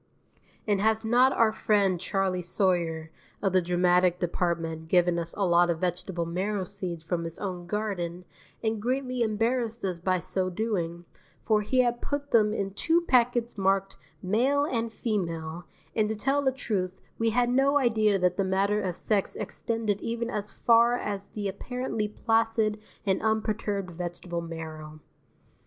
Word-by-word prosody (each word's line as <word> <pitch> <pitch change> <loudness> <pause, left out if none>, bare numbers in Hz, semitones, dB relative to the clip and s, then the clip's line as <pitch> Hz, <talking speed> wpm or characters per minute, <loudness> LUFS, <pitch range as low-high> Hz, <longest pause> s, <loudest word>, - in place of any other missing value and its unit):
And 205 -2 +2
has 220 +1 +2
not 250 +4 +5
our 230 -3 +3
friend 200 -4 +2
Charley 190 -1 0
Sawyer 170 -3 0 0.3
of 195 -2 0
the 185 - +5
dramatic 180 0 +3
department 165 -2 -2
given 175 0 +3
us 170 0 -4
a 200 - +2
lot 175 0 +4
of 170 - +1
vegetable 180 0 -2
marrow 190 +4 -1
seeds 180 -4 -5
from 170 +1 -2
his 165 -1 -6
own 180 -3 -5
garden 180 -4 -3 0.4
and 220 -1 0
greatly 255 +1 -1
embarrassed 230 +1 0
us 180 -3 -2
by 185 +2 +1
so 185 +2 -1
doing, 175 -4 -2 0.4
for 215 -1 +3
he 255 +5 +2
has 240 -1 +2
put 285 0 -3
them 215 -2 +4
in 200 -2 -2
two 330 - +2
packets 240 -6 +2
marked 195 0 +1 0.2
"Male" 255 +9 +2
and 230 -5 -1
"Female," 170 -7 -3 0.3
and 215 -1 +2
to 220 - -1
tell 270 +6 +1
the 265 - +3
truth 190 -8 -3 0.2
we 225 0 +2
had 245 +2 +2
no 275 +3 +4
idea 220 -6 +3
that 180 -1 +1
the 195 - +2
matter 195 +2 +1
of 185 -3 -3
sex 205 -3 0
extended 220 -3 -2
even 235 +1 -2
as 210 -2 -3
far 235 +1 +4
as 200 -4 -4
the 205 -2 -4
apparently 225 +2 -3
placid 225 0 +1 0.3
and 190 -2 +1
unperturbed 215 -3 -1
vegetable 175 0 -5
marrow. 160 -2 -7
200 Hz, 160 wpm, -28 LUFS, 180-225 Hz, 0.4 s, not